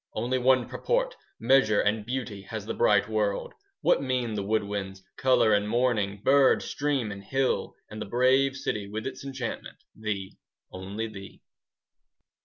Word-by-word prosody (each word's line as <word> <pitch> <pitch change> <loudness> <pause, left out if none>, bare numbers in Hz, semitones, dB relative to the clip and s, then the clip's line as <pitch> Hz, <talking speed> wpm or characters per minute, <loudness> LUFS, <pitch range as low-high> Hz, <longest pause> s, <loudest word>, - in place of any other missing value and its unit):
Only 130 +2 0
one 130 -1 +3
purport, - - -1 0.2
Measure 115 -3 +4
and 105 +1 +1
beauty, 120 -4 -4
5 95 - -18
Has 110 -2 -5
the - - -3
bright 105 -1 +3
world. 105 -2 -1 0.3
What - - +3
mean 125 -4 -1
the 105 - -2
wood 105 +2 0
winds, 95 -1 -5
Colour 130 -4 +3
and 105 0 +1
morning, 110 -4 0
Bird, 135 0 +5
stream, 140 -7 -1
and 100 0 -8
hill? 135 +4 -1
And 110 - -8
the - - -4
brave 130 +4 +3
city 105 -6 -3
10 100 - -12
With 110 +1 -4
its 130 0 -6
enchantment? 130 -3 -5 0.2
Thee, 105 -3 -4 0.3
only 95 +4 -5
thee! 100 -3 -11
110 Hz, 165 wpm, -27 LUFS, 105-130 Hz, 0.3 s, Bird